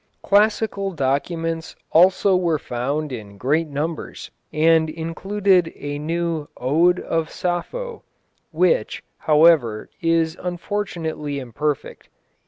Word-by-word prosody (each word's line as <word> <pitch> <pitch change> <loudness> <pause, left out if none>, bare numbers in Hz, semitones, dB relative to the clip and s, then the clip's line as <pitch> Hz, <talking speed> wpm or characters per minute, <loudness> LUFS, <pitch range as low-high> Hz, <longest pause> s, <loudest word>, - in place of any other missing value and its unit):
Classical 205 -1 +2
documents 165 +3 -2 0.2
also 185 +3 +5
were 170 -3 +1
found 140 +4 -3
in 105 -5 -8
great 150 +9 +1
numbers, 150 +3 -5 0.2
and 160 +1 +3
included 180 +3 +1
a 145 0 -5
new 165 0 -2
Ode 165 +8 +3
of 165 -1 -2
Sappho, 460 - -3 0.5
which, - - +1 0.2
however, 150 -8 +4
is 165 -1 +2
unfortunately 175 -5 -3
imperfect. 140 +3 -4
165 Hz, 95 wpm, -22 LUFS, 150-180 Hz, 0.5 s, also